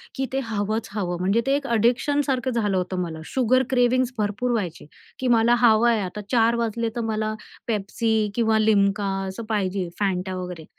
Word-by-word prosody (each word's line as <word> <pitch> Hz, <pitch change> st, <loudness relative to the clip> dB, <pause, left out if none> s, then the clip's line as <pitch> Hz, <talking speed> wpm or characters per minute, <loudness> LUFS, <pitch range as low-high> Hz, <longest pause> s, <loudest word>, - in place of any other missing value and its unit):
की 265 Hz, -1 st, -1 dB
ते 270 Hz, -, +1 dB
हवंच 215 Hz, 0 st, -2 dB
हवं. 180 Hz, -4 st, -2 dB
म्हणजे 200 Hz, +5 st, +2 dB
ते 275 Hz, -, +3 dB
एक 285 Hz, -1 st, -3 dB
एडिक्शनसारखं 255 Hz, +3 st, +1 dB
झालं 205 Hz, -5 st, 0 dB
होतं 185 Hz, 0 st, -2 dB
मला. 160 Hz, -2 st, -5 dB
शुगर 255 Hz, 0 st, +2 dB
क्रेव्हिंग्ज 250 Hz, 0 st, +2 dB
भरपूर 215 Hz, +4 st, -1 dB
व्हायचे 185 Hz, -11 st, -3 dB, 0.3 s
की 260 Hz, -, -1 dB
मला 235 Hz, +2 st, +4 dB
हवं 235 Hz, 0 st, +5 dB
आहे. 225 Hz, -2 st, +2 dB
आता 195 Hz, +3 st, -5 dB
4:00 230 Hz, -1 st, +3 dB
वाजले, 230 Hz, 0 st, -1 dB
तर 235 Hz, -, -1 dB
मला 215 Hz, 0 st, -1 dB, 0.3 s
पेप्सी 215 Hz, 0 st, 0 dB
किंवा 225 Hz, -2 st, +2 dB
लिम्का 205 Hz, -2 st, +2 dB, 0.2 s
असं 190 Hz, +4 st, -6 dB
पाहिजे, 195 Hz, -3 st, -1 dB
फँटा 190 Hz, -1 st, -1 dB
वगैरे. 180 Hz, -3 st, -6 dB
220 Hz, 170 wpm, -24 LUFS, 195-240 Hz, 0.3 s, हवं